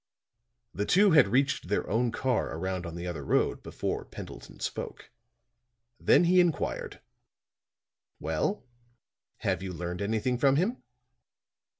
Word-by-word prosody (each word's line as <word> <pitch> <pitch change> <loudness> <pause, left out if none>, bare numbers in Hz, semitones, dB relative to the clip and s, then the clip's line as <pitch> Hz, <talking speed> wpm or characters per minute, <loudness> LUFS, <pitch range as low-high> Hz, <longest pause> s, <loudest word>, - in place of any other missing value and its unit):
The 105 - -2
two 200 +2 +5
had 150 -9 +7
reached 130 +1 +1
their 105 - 0
own 120 +2 +1
car 125 -9 -1
around 95 0 -3
on 85 - -7
the 85 +1 -5
other 85 -5 -4
road - - +1
before - - -3
Pendleton - - -10
spoke. - - -5 0.9
Then - - +5
he 180 +1 +5
inquired: 160 - 0 1.2
"Well, 80 - -1 0.8
have - - 0
you 95 -1 -4
learned 90 +1 -5
anything 110 +4 0
from 135 0 +4
him?" 200 - 0
110 Hz, 125 wpm, -29 LUFS, 90-145 Hz, 1.2 s, had